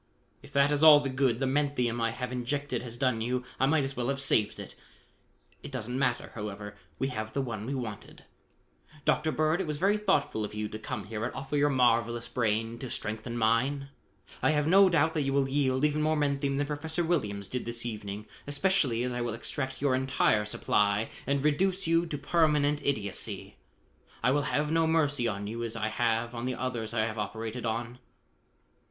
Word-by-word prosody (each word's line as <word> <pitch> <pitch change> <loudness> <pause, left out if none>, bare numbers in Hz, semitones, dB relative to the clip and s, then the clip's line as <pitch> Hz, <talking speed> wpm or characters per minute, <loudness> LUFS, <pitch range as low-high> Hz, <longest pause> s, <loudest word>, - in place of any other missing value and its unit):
"If 145 - -15
that 140 +1 +4
is 145 0 +1
all 155 -2 +10
the 140 -2 -3
good 130 -3 +1
the 135 - +1
menthium 130 -4 0
I 115 - +2
have 125 +2 -5
injected 125 +1 -2
has 120 -1 -7
done 125 -3 +1
you, 125 +2 -1 0.2
I 135 - +4
might 150 0 +3
as 135 0 -3
well 120 0 -2
have 140 0 -1
saved 115 -6 +1
it. - - -8 0.9
It - - -9
doesn't 125 -2 -4
matter, 125 -3 0
however: 105 -1 -6 0.2
we 135 - -1
have 110 -3 -5
the 140 - 0
one 110 -3 -5
we 140 - -2
wanted. 110 -5 -7 0.8
Dr. 155 +1 +2
Bird, 155 +4 +1
it 185 - -3
was 150 -1 -2
very 200 +6 +3
thoughtful 150 - +1
of 105 - -5
you 105 0 -2
to 110 - -7
come 110 -1 -5
here 110 +1 -5
and 120 - -1
offer 135 +2 -4
your 145 0 +3
marvelous 120 -3 +2
brain 115 0 -1
to 130 - -6
strengthen 110 +2 -3
mine. 130 +5 +1 0.5
I - - +3
have 150 -2 +2
no 190 +4 +6
doubt 160 -1 +3
that 155 - 0
you 135 -1 0
will 140 -1 +2
yield 135 0 +1
even 150 0 +1
more 155 +1 +2
menthium 140 -1 0
than 145 - +1
Professor 160 +3 -2
Williams 105 - -1
did 125 - -4
this 115 0 -3
evening 105 -2 -5 0.2
especially 145 -6 +1
as 125 - -1
I 120 0 -2
will 120 -2 -2
extract 130 +3 -3
your 140 -2 +3
entire 130 -5 +2
supply 105 0 +1 0.2
and 140 +1 0
reduce 185 +6 +2
you 165 +1 +2
to 150 - -3
permanent 150 -1 +2
idiocy. 105 -8 -2 0.7
I 125 - +4
will 145 -1 +1
have 150 +1 0
no 165 0 +3
mercy 145 -6 +2
on 100 -2 -3
you 115 +3 -4
as 115 -1 -3
I 110 -1 -1
have 115 +1 0
on 120 0 -4
the 130 0 -1
others 120 -4 -3
I 110 -2 +1
have 110 -1 -4
operated 110 +3 -4
on." 115 +2 -1
Dr. 120 +1 -15
130 Hz, 205 wpm, -29 LUFS, 115-145 Hz, 0.9 s, all